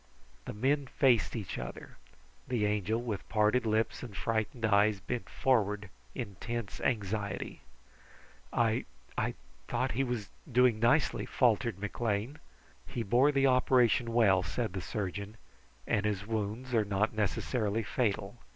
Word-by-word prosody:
The -, -, -5 dB
men 135 Hz, +6 st, +1 dB
faced 120 Hz, -10 st, +3 dB
each 105 Hz, -8 st, -4 dB
other. 60 Hz, 0 st, -8 dB, 0.5 s
The 120 Hz, -4 st, +1 dB
Angel, 105 Hz, +2 st, 0 dB
with 115 Hz, -4 st, -4 dB
parted 110 Hz, +2 st, +2 dB
lips 110 Hz, +1 st, 0 dB
and 115 Hz, -6 st, -8 dB
frightened 115 Hz, +1 st, -1 dB
eyes, 105 Hz, -1 st, +4 dB
bent 120 Hz, +4 st, -4 dB
forward 105 Hz, -6 st, +1 dB, 0.2 s
in 100 Hz, -6 st, -5 dB
tense 120 Hz, -4 st, -4 dB
anxiety. 100 Hz, -4 st, -2 dB, 0.9 s
"I 115 Hz, 0 st, +1 dB, 0.3 s
I -, -, -1 dB, 0.3 s
thought -, -, 0 dB
he 125 Hz, +6 st, 0 dB
was 120 Hz, -5 st, -3 dB, 0.2 s
doing 125 Hz, -2 st, +4 dB
nicely?" 120 Hz, +7 st, +2 dB
faltered 115 Hz, -4 st, +2 dB
McLean. 105 Hz, +5 st, -2 dB, 0.5 s
"He 115 Hz, -, -3 dB
bore 125 Hz, +7 st, +4 dB
the 140 Hz, -1 st, +3 dB
operation 125 Hz, -2 st, +3 dB
well," 105 Hz, -6 st, +4 dB
replied 115 Hz, +5 st, -3 dB
the 95 Hz, -, -3 dB
surgeon, 100 Hz, +2 st, -4 dB, 0.5 s
"and 105 Hz, -, +1 dB
his 105 Hz, -2 st, -1 dB
wounds 110 Hz, +3 st, -3 dB
are 110 Hz, -2 st, +4 dB
not 105 Hz, +1 st, 0 dB
necessarily 110 Hz, +1 st, 0 dB
fatal. 105 Hz, -1 st, -1 dB
110 Hz, 135 wpm, -31 LUFS, 100-120 Hz, 0.9 s, eyes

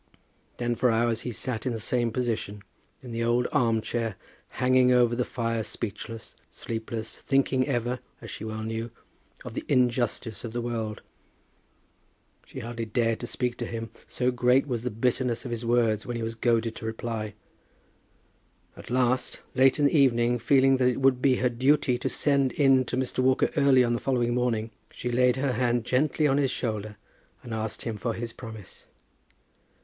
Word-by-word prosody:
Then 120 Hz, 0 st, 0 dB
for 125 Hz, +2 st, +2 dB
hours 115 Hz, 0 st, +1 dB
he 125 Hz, -, -4 dB
sat 115 Hz, 0 st, -3 dB
in 125 Hz, -, 0 dB
the 115 Hz, -, -3 dB
same 120 Hz, +2 st, 0 dB
position, 110 Hz, -4 st, -3 dB, 0.4 s
in 125 Hz, -, -8 dB
the 115 Hz, 0 st, -2 dB
old 120 Hz, +1 st, +2 dB
arm 115 Hz, -2 st, +2 dB
chair, 115 Hz, -2 st, -2 dB, 0.3 s
hanging 130 Hz, 0 st, +3 dB
over 120 Hz, -1 st, +4 dB
the 125 Hz, -, +1 dB
fire 115 Hz, -2 st, -2 dB
speechless, 110 Hz, +1 st, -6 dB
sleepless, 115 Hz, -1 st, -5 dB
thinking 135 Hz, -1 st, +1 dB
ever, 125 Hz, -1 st, -1 dB, 0.2 s
as -, -, -9 dB
she -, -, -7 dB
well 110 Hz, 0 st, -4 dB
knew, 115 Hz, +1 st, -3 dB, 0.6 s
of -, -, -7 dB
the -, -, -4 dB
injustice 120 Hz, -2 st, +1 dB
of 115 Hz, -2 st, -6 dB
the 120 Hz, -, -2 dB
world. 115 Hz, -3 st, -4 dB, 1.4 s
She -, -, -8 dB
hardly 115 Hz, 0 st, -4 dB
dared 115 Hz, +1 st, 0 dB
to 120 Hz, -, -5 dB
speak 125 Hz, 0 st, -1 dB
to 120 Hz, -, -4 dB
him, 115 Hz, -1 st, -5 dB, 0.2 s
so 125 Hz, 0 st, 0 dB
great 125 Hz, +2 st, +3 dB
was 120 Hz, -5 st, -2 dB
the 125 Hz, -, -2 dB
bitterness 125 Hz, +2 st, -1 dB
of 125 Hz, -, -5 dB
his 115 Hz, 0 st, -3 dB
words 115 Hz, -3 st, +2 dB
when 120 Hz, -1 st, -3 dB
he 115 Hz, -, -3 dB
was 115 Hz, 0 st, -3 dB
goaded 115 Hz, 0 st, +1 dB
to -, -, -7 dB
reply. 110 Hz, -2 st, -4 dB, 1.4 s
At -, -, -12 dB
last, 125 Hz, 0 st, 0 dB
late 135 Hz, +1 st, +4 dB
in 145 Hz, -, +2 dB
the 140 Hz, -, +3 dB
evening, 120 Hz, -4 st, +3 dB
feeling 135 Hz, +2 st, +4 dB
that 130 Hz, -1 st, +3 dB
it 125 Hz, 0 st, +1 dB
would 135 Hz, -2 st, +3 dB
be 135 Hz, -2 st, +4 dB
her 125 Hz, -, +1 dB
duty 125 Hz, 0 st, +2 dB
to -, -, -1 dB
send 140 Hz, -3 st, +2 dB
in 135 Hz, -3 st, +4 dB
to 125 Hz, -, -3 dB
Mr. 130 Hz, 0 st, -2 dB
Walker 130 Hz, +1 st, +3 dB
early 140 Hz, -4 st, +5 dB
on 120 Hz, -1 st, +1 dB
the 120 Hz, -, -1 dB
following 120 Hz, -3 st, 0 dB
morning, 115 Hz, -2 st, 0 dB, 0.2 s
she 120 Hz, -, -5 dB
laid 125 Hz, +1 st, +3 dB
her 135 Hz, -1 st, 0 dB
hand 120 Hz, -1 st, +1 dB
gently 150 Hz, +4 st, +1 dB
on 140 Hz, -1 st, +3 dB
his 135 Hz, -2 st, +2 dB
shoulder 110 Hz, -4 st, -3 dB, 0.5 s
and 120 Hz, -, -7 dB
asked 110 Hz, -1 st, -3 dB
him 115 Hz, -3 st, -3 dB
for 115 Hz, +2 st, -2 dB
his 115 Hz, 0 st, -5 dB
promise. 110 Hz, -5 st, -10 dB
120 Hz, 185 wpm, -27 LUFS, 115-125 Hz, 1.4 s, early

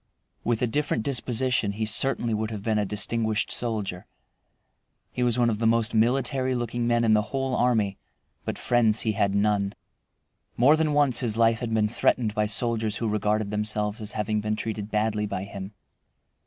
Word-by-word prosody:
With 120 Hz, 0 st, 0 dB
a -, -, +5 dB
different 130 Hz, -2 st, -1 dB
disposition 125 Hz, -4 st, 0 dB
he 110 Hz, +2 st, -2 dB
certainly 120 Hz, +1 st, +2 dB
would 110 Hz, 0 st, -1 dB
have 105 Hz, -3 st, -6 dB
been 110 Hz, -1 st, +1 dB
a 105 Hz, -, 0 dB
distinguished 110 Hz, +1 st, -1 dB
soldier. 105 Hz, -6 st, -2 dB, 1.0 s
He -, -, -4 dB
was 120 Hz, -1 st, +2 dB
one 120 Hz, -1 st, +3 dB
of 105 Hz, -, -3 dB
the 115 Hz, -, +2 dB
most 115 Hz, -1 st, +2 dB
military 130 Hz, +3 st, +1 dB
looking 120 Hz, 0 st, -2 dB
men 120 Hz, 0 st, +2 dB
in 110 Hz, -1 st, +4 dB
the 105 Hz, -, +4 dB
whole 135 Hz, -1 st, -1 dB
army, 110 Hz, -6 st, +1 dB, 0.4 s
but -, -, -4 dB
friends 115 Hz, -3 st, +2 dB
he 110 Hz, -, 0 dB
had 100 Hz, -1 st, 0 dB
none. 100 Hz, -1 st, +1 dB, 0.8 s
More 140 Hz, +6 st, +6 dB
than 155 Hz, -1 st, 0 dB
once 145 Hz, -4 st, +3 dB
his 115 Hz, -3 st, -1 dB
life 115 Hz, 0 st, +3 dB
had 120 Hz, -2 st, -4 dB
been 110 Hz, -1 st, +2 dB
threatened 110 Hz, 0 st, +1 dB
by 105 Hz, 0 st, 0 dB
soldiers 110 Hz, 0 st, 0 dB
who 115 Hz, -, -2 dB
regarded 105 Hz, 0 st, 0 dB
themselves 105 Hz, 0 st, -2 dB
as 105 Hz, 0 st, -5 dB
having 105 Hz, 0 st, -1 dB
been 105 Hz, 0 st, -1 dB
treated 105 Hz, -1 st, -4 dB
badly 105 Hz, 0 st, 0 dB
by 95 Hz, -, -4 dB
him. 100 Hz, 0 st, -7 dB
110 Hz, 180 wpm, -26 LUFS, 105-120 Hz, 1.0 s, More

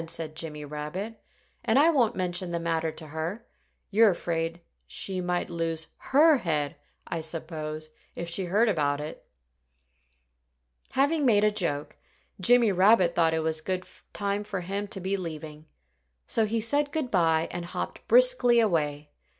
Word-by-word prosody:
said 155 Hz, -2 st, -3 dB
Jimmy 150 Hz, -2 st, -6 dB
Rabbit. 150 Hz, +10 st, -6 dB, 0.4 s
"And 220 Hz, -, +2 dB
I 310 Hz, +4 st, +6 dB
won't 240 Hz, -7 st, +2 dB
mention 180 Hz, 0 st, -2 dB
the 170 Hz, 0 st, -2 dB
matter 165 Hz, -1 st, -1 dB
to 155 Hz, 0 st, -10 dB
her. 165 Hz, +9 st, -4 dB, 0.5 s
You're 220 Hz, +2 st, +6 dB
afraid 165 Hz, -2 st, -2 dB, 0.3 s
she 190 Hz, -2 st, -3 dB
might 180 Hz, 0 st, -1 dB
lose 165 Hz, -2 st, -2 dB, 0.3 s
her 310 Hz, +1 st, +7 dB
head, 150 Hz, -7 st, -1 dB, 0.3 s
I 165 Hz, -, -3 dB
suppose, 155 Hz, -1 st, -5 dB, 0.2 s
if 170 Hz, -, -5 dB
she 175 Hz, +3 st, -2 dB
heard 205 Hz, +7 st, +2 dB
about 145 Hz, -8 st, +1 dB
it." 150 Hz, +1 st, -7 dB, 1.7 s
Having 285 Hz, +1 st, +2 dB
made 210 Hz, -3 st, +4 dB
a 210 Hz, -, +4 dB
joke, 170 Hz, -8 st, -2 dB, 0.4 s
Jimmy 235 Hz, +2 st, +5 dB
Rabbit 185 Hz, -1 st, +4 dB
thought 165 Hz, -1 st, +2 dB
it 160 Hz, -, -1 dB
was 160 Hz, 0 st, +1 dB
a -, -, -12 dB
good 185 Hz, 0 st, -2 dB, 0.3 s
time 200 Hz, 0 st, -2 dB
for 200 Hz, -3 st, -4 dB
him 200 Hz, +3 st, -3 dB
to 195 Hz, -, -5 dB
be 190 Hz, +2 st, -1 dB
leaving. 155 Hz, -3 st, -7 dB, 0.6 s
So 225 Hz, -, +2 dB
he 225 Hz, +2 st, 0 dB
said 285 Hz, +5 st, +2 dB
good 305 Hz, -6 st, -2 dB
by 165 Hz, -3 st, +2 dB
and 175 Hz, -1 st, -5 dB
hopped 175 Hz, -, -6 dB
briskly -, -, +5 dB
away. 150 Hz, -8 st, 0 dB
175 Hz, 160 wpm, -27 LUFS, 160-215 Hz, 1.7 s, her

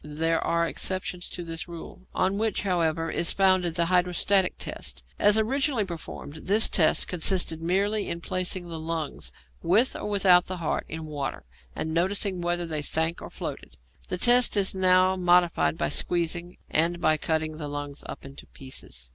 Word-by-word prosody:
There 160 Hz, +2 st, -1 dB
are 170 Hz, 0 st, +1 dB
exceptions 180 Hz, -1 st, -3 dB
to 175 Hz, -, -6 dB
this 165 Hz, 0 st, -6 dB
rule, 170 Hz, +1 st, -10 dB
on 190 Hz, +2 st, +1 dB
which, 220 Hz, -1 st, 0 dB
however, 165 Hz, -4 st, 0 dB
is 170 Hz, -, 0 dB
founded 185 Hz, -3 st, +2 dB
the 170 Hz, -1 st, +2 dB
hydrostatic 180 Hz, +2 st, +2 dB
test. -, -, -6 dB, 0.2 s
As 205 Hz, +1 st, +5 dB
originally 255 Hz, +1 st, +1 dB
performed, 160 Hz, -3 st, -8 dB
this 210 Hz, +3 st, +4 dB
test 160 Hz, -4 st, +3 dB
consisted 175 Hz, -2 st, 0 dB
merely 200 Hz, +5 st, 0 dB
in 170 Hz, -, -3 dB
placing 185 Hz, 0 st, -2 dB
the 165 Hz, -1 st, -6 dB
lungs, 160 Hz, -1 st, -4 dB, 0.3 s
with 215 Hz, +9 st, +3 dB
or -, -, -4 dB
without 185 Hz, -3 st, +4 dB
the 185 Hz, -, -4 dB
heart, 165 Hz, -3 st, -2 dB
in 160 Hz, 0 st, -6 dB
water, 145 Hz, -3 st, -5 dB, 0.3 s
and 160 Hz, -, -3 dB
noticing 185 Hz, +2 st, 0 dB
whether 175 Hz, 0 st, -1 dB
they 155 Hz, -2 st, -2 dB
sank 160 Hz, +3 st, 0 dB
or -, -, -8 dB
floated. -, -, -7 dB, 0.3 s
The -, -, -2 dB
test 245 Hz, +2 st, +5 dB
is 195 Hz, -1 st, +2 dB
now 185 Hz, 0 st, +4 dB
modified 175 Hz, -2 st, +2 dB
by -, -, 0 dB
squeezing, 175 Hz, 0 st, -2 dB
and 170 Hz, +2 st, +1 dB
by 155 Hz, -2 st, +3 dB
cutting 155 Hz, 0 st, -2 dB
the 150 Hz, -2 st, -5 dB
lungs 145 Hz, 0 st, -6 dB
up -, -, -8 dB
into 135 Hz, +1 st, -11 dB
pieces. 100 Hz, -, -7 dB
175 Hz, 170 wpm, -26 LUFS, 160-190 Hz, 0.3 s, As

